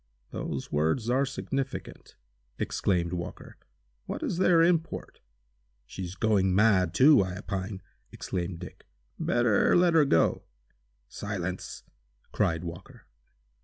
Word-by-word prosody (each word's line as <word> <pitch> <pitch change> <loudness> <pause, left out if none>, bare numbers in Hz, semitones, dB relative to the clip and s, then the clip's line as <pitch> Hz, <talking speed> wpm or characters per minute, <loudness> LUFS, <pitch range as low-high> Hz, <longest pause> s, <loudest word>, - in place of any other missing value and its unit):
"Those 70 - -5
words 80 - 0
are 135 +2 +2
significant!" 135 0 -5 0.4
exclaimed 90 -3 -1
Walker. 85 -1 -7 0.5
"What - - -4
is 175 - -2
their 175 -3 +5
import?" 165 -1 -1 0.6
"She's 90 +6 -7
going 95 -4 +2
mad, 95 -4 +3
too, 140 0 +7
I 95 -1 -5
opine!" 95 -1 -5 0.3
exclaimed 90 -1 -4
Dick. 90 0 -11 0.3
"Better 120 -3 +2
let 175 -1 +4
her 160 -2 +5
go!" 85 -12 +2 0.7
"Silence!" 95 -3 -5 0.5
cried 80 +1 0
Walker. 90 +2 -9
100 Hz, 110 wpm, -28 LUFS, 90-135 Hz, 0.7 s, too